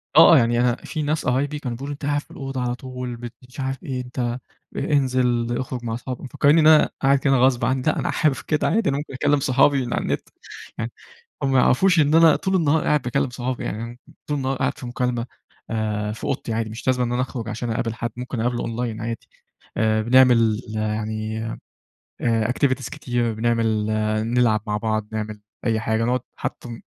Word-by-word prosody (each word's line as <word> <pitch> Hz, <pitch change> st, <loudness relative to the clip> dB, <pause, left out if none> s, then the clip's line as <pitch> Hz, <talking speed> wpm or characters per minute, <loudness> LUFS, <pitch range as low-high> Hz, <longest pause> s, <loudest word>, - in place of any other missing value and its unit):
آه، -, -, +10 dB
آه -, -, +8 dB
يعني 120 Hz, 0 st, +3 dB
أنا 120 Hz, -1 st, +3 dB
في 155 Hz, +4 st, -5 dB
ناس 150 Hz, +2 st, -1 dB
قرايبي 140 Hz, +4 st, 0 dB
كان 125 Hz, -5 st, -4 dB
بيقولوا 140 Hz, +4 st, -6 dB
لي: -, -, -2 dB
"أنتَ 140 Hz, 0 st, -7 dB
قاعد 145 Hz, 0 st, +1 dB
في -, -, -22 dB
الأوضة 135 Hz, -2 st, -5 dB
على 120 Hz, 0 st, -1 dB
طول، 125 Hz, -1 st, -6 dB
بت 120 Hz, 0 st, -8 dB, 0.2 s
مش 130 Hz, -, -12 dB
عارف 135 Hz, +4 st, -3 dB
إيه، 130 Hz, -5 st, -3 dB
أنتَ 125 Hz, +1 st, -8 dB
أ 120 Hz, +1 st, -1 dB, 0.4 s
أنزل، 125 Hz, -4 st, +1 dB
اُخرج 125 Hz, -2 st, -4 dB
مع 115 Hz, -1 st, -2 dB
صحابك." 125 Hz, +1 st, -6 dB
مفكرينني 145 Hz, +4 st, +3 dB
إن 155 Hz, -, +5 dB
أنا 155 Hz, -1 st, +6 dB
قاعد 135 Hz, 0 st, +4 dB
كده 135 Hz, 0 st, +2 dB
غصب 125 Hz, -1 st, +3 dB
عني، 130 Hz, +1 st, +1 dB
لأ 155 Hz, -, +1 dB
أنا -, -, -1 dB
حابب 150 Hz, -4 st, +2 dB
كده 155 Hz, -2 st, +1 dB
عادي، 220 Hz, -4 st, +2 dB
أنا 140 Hz, -, 0 dB
ممكن 145 Hz, -1 st, -6 dB
أكلم 145 Hz, +2 st, +2 dB
صحابي 135 Hz, 0 st, +3 dB
من 120 Hz, -, -3 dB
على -, -, 0 dB
النت. -, -, -3 dB, 0.5 s
يعني، 115 Hz, 0 st, -3 dB, 0.5 s
هم 135 Hz, -, +1 dB
ما 130 Hz, -, +4 dB
يعرفوش 180 Hz, +8 st, +4 dB
إن 150 Hz, +1 st, +4 dB
أنا 165 Hz, -1 st, +7 dB
طول 190 Hz, 0 st, -1 dB
النهار 160 Hz, -3 st, +2 dB
قاعد 150 Hz, -2 st, +2 dB
باكلم 125 Hz, +2 st, 0 dB
صحابي، 125 Hz, 0 st, -4 dB
يعني 115 Hz, +3 st, -5 dB, 0.3 s
طول 150 Hz, -, -1 dB
النهار 135 Hz, 0 st, -1 dB
قاعد 130 Hz, +2 st, -1 dB
في 125 Hz, -, -8 dB
مكالمة، 120 Hz, -1 st, -1 dB, 0.4 s
آآ، 105 Hz, -2 st, -1 dB
في 110 Hz, -, -9 dB
أوضتي 130 Hz, -4 st, -2 dB
عادي 110 Hz, 0 st, -1 dB
مش 115 Hz, +4 st, -9 dB
لازمًا 125 Hz, -1 st, +2 dB
إن 120 Hz, -, -3 dB
أنا 125 Hz, -, +1 dB
أخرج 120 Hz, -3 st, -4 dB
عشان 115 Hz, +2 st, -3 dB
أقابل 115 Hz, 0 st, -1 dB
حد، 115 Hz, 0 st, -4 dB
ممكن 125 Hz, -1 st, -4 dB
أقابله 120 Hz, +1 st, 0 dB
أونلاين 115 Hz, -1 st, -3 dB
عادي. 115 Hz, 0 st, -5 dB, 0.5 s
آآ 110 Hz, 0 st, +2 dB
بنعمل 120 Hz, -2 st, +4 dB
يعني 110 Hz, +1 st, -2 dB, 0.8 s
آآ، 115 Hz, -1 st, +1 dB
activities 130 Hz, -1 st, 0 dB
كتير، 120 Hz, -2 st, -2 dB
بنعمل 110 Hz, -1 st, +1 dB, 0.5 s
نلعب 115 Hz, -4 st, +3 dB
مع 105 Hz, 0 st, 0 dB
بعض، 110 Hz, -1 st, -1 dB
نعمل 110 Hz, -1 st, -4 dB, 0.2 s
أي 110 Hz, -2 st, +2 dB
حاجة، 110 Hz, 0 st, 0 dB
نقعد 125 Hz, +1 st, +1 dB
حتى 125 Hz, -, -5 dB
ن 115 Hz, -1 st, -8 dB
125 Hz, 210 wpm, -23 LUFS, 115-135 Hz, 0.8 s, آه